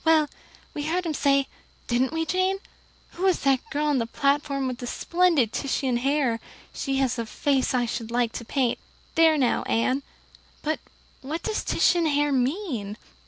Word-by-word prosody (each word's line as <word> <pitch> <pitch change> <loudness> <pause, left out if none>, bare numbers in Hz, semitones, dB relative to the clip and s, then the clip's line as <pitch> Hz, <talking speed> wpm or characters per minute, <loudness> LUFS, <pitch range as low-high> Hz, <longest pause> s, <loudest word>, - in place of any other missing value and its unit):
Well, 315 -2 +4 0.4
we 295 - -4
heard 350 +3 0
him 325 - -1
say 275 -1 +2 0.4
didn't 250 +2 +1
we, 325 0 -1
Jane? 370 +3 +1 0.5
'Who 375 +2 -1
is 370 - +2
that 270 -2 +3
girl 295 +1 -1
on 290 -3 +2
the 230 - -1
platform 280 +1 0
with 250 -1 -4
the 245 - -5
splendid 335 -8 +2
Titian 265 -3 0
hair? 265 -2 +1 0.3
She 270 -1 -2
has 255 -2 +1
a 230 - -1
face 265 +2 +1
I 245 -1 +2
should 230 -1 -4
like 240 -1 +1
to 235 - -6
paint.' 250 0 0 0.3
There 320 -1 +5
now, 255 -4 +2
Anne. 255 +4 +1 0.6
But 310 +1 -1 0.4
what 310 +5 -4
does 435 -1 -1
Titian 345 -2 +3
hair 290 -1 +2
mean?" 255 - -1
275 Hz, 170 wpm, -25 LUFS, 250-315 Hz, 0.6 s, There